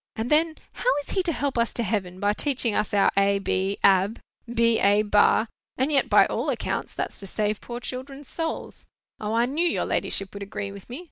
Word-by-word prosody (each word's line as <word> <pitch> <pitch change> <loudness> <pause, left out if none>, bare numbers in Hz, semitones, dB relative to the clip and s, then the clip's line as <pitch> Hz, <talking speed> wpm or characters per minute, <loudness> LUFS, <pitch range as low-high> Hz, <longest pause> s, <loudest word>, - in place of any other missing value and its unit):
And 225 +4 -3
then, 315 +1 +3 0.2
how - - -1
is - - -6
he 380 - +1
to 355 -2 0
help 280 -4 -1
us 235 - 0
to 235 - 0
heaven, 185 -4 -2
by 205 +1 +2
teaching 255 -2 0
us 210 - 0
our, 200 -1 +3
a 200 0 +3
b, 195 0 -1
ab—b 225 +4 +2
a, 205 +1 +4
ba? 210 +2 +4 0.3
And 265 +4 +1
yet, 280 -2 +2
by - - +6
all - - -2
accounts, - - -3
that's - - -4
to 195 - -8
save 210 +1 -1
poor 240 0 -6
children's 265 +3 -7
souls. 325 -1 -5 0.3
O, 215 +1 -2
I 235 +1 +3
knew 290 +7 -1
your 335 - 0
ladyship 195 -1 -2
would 200 - -8
agree 200 0 -5
with 200 +2 -12
me. 250 +5 -6
225 Hz, 210 wpm, -25 LUFS, 200-265 Hz, 0.3 s, by